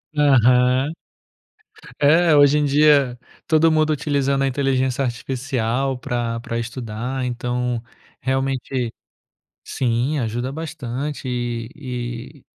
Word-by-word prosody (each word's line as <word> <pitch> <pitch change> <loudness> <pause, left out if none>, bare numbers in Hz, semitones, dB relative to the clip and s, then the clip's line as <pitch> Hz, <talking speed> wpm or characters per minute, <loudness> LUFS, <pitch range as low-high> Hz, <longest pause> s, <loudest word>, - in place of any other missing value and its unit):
Aham. 130 -1 +4 1.1
É, 160 +2 +5
hoje 145 0 +6
em 145 - +1
dia 140 -3 +4 0.3
todo 160 0 +4
mundo 155 0 +2
utilizando 140 -2 0
a - - +2
inteligência 135 -1 0
artificial 130 +1 -2
pra 120 -2 -2
pra 115 0 -4
estudar, 120 +2 -4
então, 125 -1 -2 0.4
realmente 130 -2 -1 0.7
sim, 125 +4 -1
ajuda 120 +3 -2
bastante 145 -3 -5
e 120 -2 -3 0.7
e - - -23
130 Hz, 100 wpm, -21 LUFS, 120-145 Hz, 1.1 s, hoje